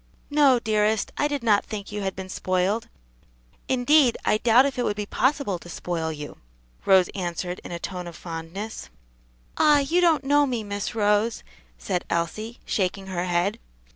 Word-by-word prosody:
"No, 285 -3 +5
dearest, 215 -1 +1
I 290 - +1
did 285 -4 -3
not 210 -3 +3
think 210 -2 -7
you 210 0 -4
had 190 -1 -2
been 190 0 -6
spoiled; 185 +4 -1 0.8
indeed, 260 0 +4
I 215 - +3
doubt 240 +3 +5
if 275 -2 -2
it - - +1
would 205 - 0
be 210 0 -3
possible 255 - 0
to 175 - -13
spoil 165 -2 -3
you," 150 -1 -8 0.5
Rose 190 -2 +5
answered 180 -1 -4
in - - -8
a 170 - -3
tone 180 0 -6
of 170 - -9
fondness. 165 - -7 0.7
"Ah! 300 -1 +5
you 310 +6 +2
don't 325 -5 +3
know 290 +1 +3
me, 240 -4 -2
Miss 205 +1 -4
Rose," 210 +1 +1 0.3
said 180 -3 -2
Elsie, 215 +8 -2
shaking 190 0 -1
her 180 -2 -3
head. 180 +3 0
205 Hz, 170 wpm, -25 LUFS, 180-245 Hz, 0.8 s, No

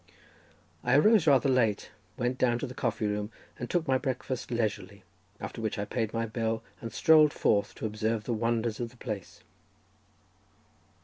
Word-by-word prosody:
I 125 +1 +3
arose 210 +1 +5
rather 140 -1 +5
late, 120 -6 +1 0.3
went 125 +1 -1
down 120 -2 +3
to 130 - -3
the 125 - -7
coffee 110 - -1
room 105 +1 -2 0.3
and 120 - -5
took 175 -3 0
my 130 -1 +3
breakfast 130 -2 -3
leisurely, 100 -4 -2 0.4
after 115 - -6
which 110 -2 -2
I 100 - -2
paid 110 0 -2
my 115 0 -1
bill 110 0 -2 0.2
and 115 - -5
strolled 155 +3 +5
forth 100 -1 +1
to - - -5
observe 110 +1 -1
the 120 - -2
wonders 115 0 -1
of 120 -1 -3
the 125 - -20
place. 105 -7 -7
115 Hz, 170 wpm, -29 LUFS, 110-130 Hz, 0.4 s, arose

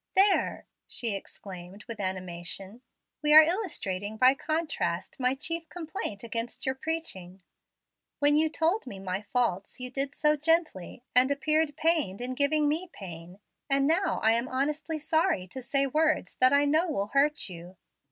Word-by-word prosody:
"There!" 390 +1 +3 0.2
she 230 -4 -1
exclaimed 195 0 -9
with 230 -2 -7
animation, 185 +3 -4 0.4
"we 300 0 +5
are 315 - +12
illustrating 220 - -2
by 255 +3 +6
contrast 310 +1 -2
my 255 +1 +1
chief 325 +3 -3
complaint 320 - -5
against 235 +3 -4
your 265 - +1
preaching. 195 - -5 0.7
When 290 0 +4
you 315 +1 +3
told 330 +3 0
me 200 - -7
my 190 0 -4
faults 210 -2 -1
you 250 0 -6
did 275 +1 -2
so 300 0 +3
gently, 305 - -1
and 255 +2 +6
appeared 305 +1 +1
pained 310 - +1
in 250 +1 -3
giving 295 +3 +2
me 330 +5 -1
pain; 175 0 -10 0.3
and 275 0 +3
now 340 +6 +1
I 220 - +5
am 235 +2 +1
honestly 295 +4 -2
sorry 315 - 0
to 260 - -7
say 275 +2 +1
words 310 +3 +1
that 255 0 +6
I 285 +1 +4
know 315 +5 +2
will 200 -9 -1
hurt 290 +3 +2
you. 175 0 -11
270 Hz, 160 wpm, -28 LUFS, 200-310 Hz, 0.7 s, are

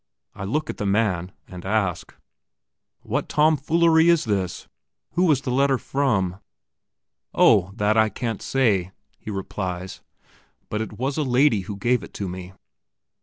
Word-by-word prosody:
I 95 - -6
look 150 +10 -1
at - - -13
the 105 - -3
man, 100 -4 0 0.2
and 90 -1 -10
ask: 95 -3 -1 0.9
"What - - -3
tomfoolery 160 +2 +3
is 170 -2 +3
this? 95 -5 -2 0.4
Who 180 0 +2
is 135 -3 +2
the 130 - -3
letter 135 +1 +3
from?" 105 -11 0 1.0
"Oh, 90 +2 +5
that 105 0 +1
I 110 0 +4
can't 115 +1 -4
say!" 100 -9 +1 0.3
he - - -9
replies; 95 -2 -5 0.7
"but 105 - -2
it 110 -1 -6
was 135 +4 -2
a - - +1
lady 130 -3 +3
who 100 +2 -6
gave 120 +3 +1
it 85 - -12
to 100 - -3
me." 90 +1 -7
110 Hz, 150 wpm, -23 LUFS, 95-135 Hz, 1.0 s, Oh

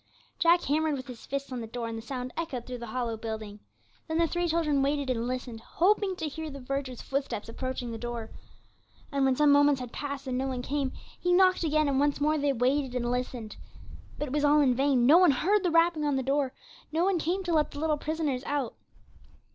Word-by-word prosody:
Jack 340 +1 +4
hammered 305 +1 +1
with 255 - -7
his 245 -2 -10
fists 275 0 -4
on 250 -2 -4
the 225 - -6
door, 235 +1 -4
and 230 - -4
the 225 - -5
sound 250 +1 -5
echoed 290 -8 -4
through 250 -1 -6
the 235 - -7
hollow 235 0 -2
building. 220 -2 -6 0.5
Then 320 -1 -1
the 335 - +4
three 345 +2 -1
children 315 -4 +1
waited, 280 -1 0
and 235 -1 -1
listened, 250 -3 -4
hoping 385 - +1
to 320 - -3
hear 315 +2 -5
the 280 -1 -8
verger's 265 -1 -4
footsteps 270 -6 -3
approaching 250 +1 -4
the 225 - -6
door. 235 -1 -5 0.8
And 275 -1 +1
when 265 -1 +3
some 295 +1 +4
moments 285 -1 +5
had 250 -2 -7
passed 280 -2 -5
and 255 -1 -2
no 265 - -1
one 255 -2 -3
came, 275 0 -1 0.3
he 355 - 0
knocked 370 0 +4
again, 305 -1 +2
and 275 -1 +1
once 290 0 +2
more 305 +1 +2
they 285 0 +2
waited 260 +1 0
and 240 -1 -1
listened. 250 -3 -4 0.6
But 295 - -3
it - - -6
was 295 0 +1
all 295 +1 +5
in 265 -3 +4
vain; 265 -1 +2
no 310 +7 +8
one 365 -2 +6
heard 375 +10 +2
the 360 - +1
rapping 330 -1 +3
on 290 -2 +1
the 265 - 0
door, 275 0 +1 0.4
no 330 +3 +1
one 380 -3 +2
came 360 +5 -1
to 350 -2 -1
let 305 -2 +3
the 285 - -8
little 310 -1 +1
prisoners 300 -5 -2
out. 280 -5 -1
275 Hz, 230 wpm, -28 LUFS, 250-310 Hz, 0.8 s, no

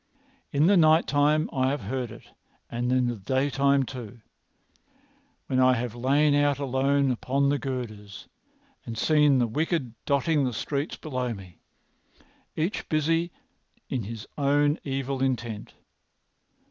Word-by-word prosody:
In 145 +2 +3
the 195 +2 +5
night 160 0 +5
time 150 +2 +2
I 130 -1 +1
have 145 +2 -2
heard 130 -4 -3
it, 115 - -12 0.5
and 120 +1 -1
in 130 -1 +3
the 120 -1 -2
daytime 135 +5 +1
too, 120 -3 -8 1.2
when 130 - 0
I 130 0 +5
have 120 -1 -3
lain 140 +5 +2
out 145 -1 +3
alone 140 0 +1
upon 135 +3 0
the 145 0 +1
girders 110 -7 -6 0.6
and 115 -1 -7
seen 150 0 +4
the 125 - +3
wicked 145 +1 -1
dotting 140 +2 +2
the 125 -2 -1
streets 140 +6 -3
beneath 125 -5 -3
me, 90 -3 -14 1.0
each 165 +6 -2
busy 165 +2 +1 0.6
on 130 - -1
his 110 +1 -7
own 145 +2 +2
evil 135 -1 -3
intent. 120 -5 -2
135 Hz, 135 wpm, -26 LUFS, 125-145 Hz, 1.2 s, the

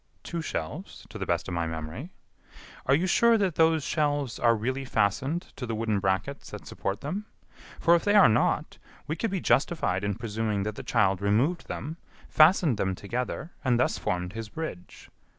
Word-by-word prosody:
"Two 170 -1 -4
shelves, 80 - -5
to - - -8
the - - -3
best - - 0
of - - -4
my 85 -1 -1
memory." 80 - -6 0.8
"Are 135 - +5
you 170 +5 +1
sure 230 +5 +4
that 195 -5 +1
those 160 -1 +3
shelves 145 -4 0
are 115 -1 +4
really 130 +5 -2
fastened 130 - -1
to 125 - -5
the 115 - -2
wooden 110 -2 0
brackets 95 +8 -2
that - - -9
support 100 +2 -4
them? 195 +9 -4 0.5
For, 170 - +5
if 170 - +3
they 205 0 +3
are 205 - +8
not, 110 - +1 0.3
we 155 - -2
could 225 +7 -1
be 195 -1 -1
justified 135 - +1
in 100 -1 -1
presuming 110 -2 -2
that 105 +1 -2
the - - -7
child 95 -4 +1
removed 120 - +1
them, 160 +3 -5 0.3
fastened 155 - +5
them 95 -1 0
together, 125 - -4
and 125 -3 +2
thus 125 - +1
formed 90 +1 -2
his 115 -1 -6
bridge. 105 - -7
125 Hz, 185 wpm, -27 LUFS, 100-160 Hz, 0.8 s, are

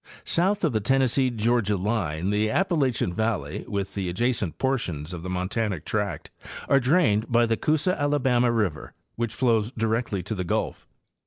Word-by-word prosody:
South 195 +4 +1
of 155 -7 +2
the 110 - +2
Tennessee 130 +3 +2
Georgia 115 -3 +1
line 95 -4 -1
the 105 +1 +1
Appalachian 135 - +1
valley, 110 +1 -2
with 100 -1 -3
the 95 -3 -2
adjacent 105 -1 -1
portions 90 - -2
of 85 - -6
the 90 - -6
montanic 90 -1 -2
tract, 100 -7 -3 0.4
are 140 - +5
drained 125 - +2
by 120 0 +4
the 115 0 +1
Coosa 155 +8 +1
Alabama 130 -4 +2
river, 105 -10 -2 0.2
which 115 -1 -3
flows 115 -4 +2
directly 115 -4 -1
to 100 - -4
the 90 -3 -3
Gulf. 85 - -2
110 Hz, 160 wpm, -25 LUFS, 100-130 Hz, 0.4 s, are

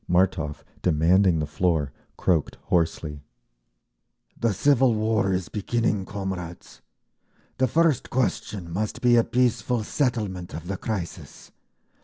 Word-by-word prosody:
Martov, 90 -4 +1 0.2
demanding 85 +2 +4
the 75 - 0
floor, 75 -2 0 0.3
croaked 85 -5 +1
hoarsely, 80 -3 0 1.1
"The 115 - +1
civil 130 +3 +3
war 110 -2 +1
is 90 -2 -1
beginning, 105 +1 -1
comrades! 95 -4 -6 0.8
The 130 - +4
first 160 0 +2
question 100 -7 -2
must 105 +3 -2
be 120 -1 +6
a 115 - +5
peaceful 125 -1 +1
settlement 105 - -2
of 80 +1 -7
the 95 +2 -3
crisis. 100 -5 -6
95 Hz, 115 wpm, -25 LUFS, 85-115 Hz, 1.1 s, be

